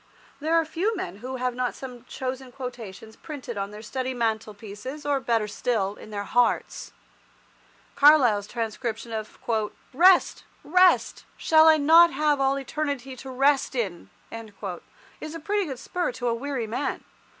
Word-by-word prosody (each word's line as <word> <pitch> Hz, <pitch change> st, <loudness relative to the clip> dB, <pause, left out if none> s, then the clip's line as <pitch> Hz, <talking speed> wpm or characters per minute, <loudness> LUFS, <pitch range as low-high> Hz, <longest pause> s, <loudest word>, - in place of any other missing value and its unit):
There 315 Hz, +3 st, 0 dB
are 330 Hz, -1 st, +3 dB
few 380 Hz, +8 st, -1 dB
men 190 Hz, -, -5 dB
who 255 Hz, +4 st, -6 dB
have 250 Hz, -1 st, -1 dB
not 250 Hz, 0 st, -2 dB
some 250 Hz, -2 st, -9 dB
chosen 260 Hz, 0 st, -5 dB
quotations 230 Hz, -5 st, -8 dB
printed 280 Hz, -6 st, -8 dB
on 200 Hz, 0 st, -3 dB
their 210 Hz, +1 st, -10 dB
study 260 Hz, +3 st, -3 dB
mantelpieces, 220 Hz, +4 st, -4 dB
or, 285 Hz, -1 st, +1 dB
better 230 Hz, -4 st, 0 dB
still, 205 Hz, -2 st, -1 dB
in 210 Hz, -, -13 dB
their 205 Hz, -1 st, -4 dB
hearts. 245 Hz, +3 st, 0 dB, 1.0 s
Carlyle's 255 Hz, -9 st, +5 dB
transcription 230 Hz, 0 st, -4 dB
of 215 Hz, -1 st, -5 dB, 0.6 s
"Rest! 360 Hz, +6 st, +5 dB, 0.2 s
Rest! 365 Hz, +3 st, +3 dB
Shall 315 Hz, 0 st, +5 dB
I 315 Hz, -1 st, +7 dB
not 325 Hz, +3 st, +7 dB
have 295 Hz, 0 st, +1 dB
all 270 Hz, 0 st, +2 dB
Eternity 275 Hz, -1 st, -4 dB
to 265 Hz, -, -9 dB
rest 270 Hz, +1 st, +2 dB
in!" 185 Hz, -, -3 dB, 0.2 s
is 225 Hz, -, -9 dB
a -, -, -5 dB
pretty 405 Hz, +5 st, -1 dB
good 270 Hz, -5 st, -5 dB
spur 350 Hz, +6 st, -2 dB
to 245 Hz, 0 st, -4 dB
a -, -, +1 dB
weary 260 Hz, 0 st, -3 dB
man. 235 Hz, +6 st, -3 dB
255 Hz, 150 wpm, -25 LUFS, 225-290 Hz, 1.0 s, I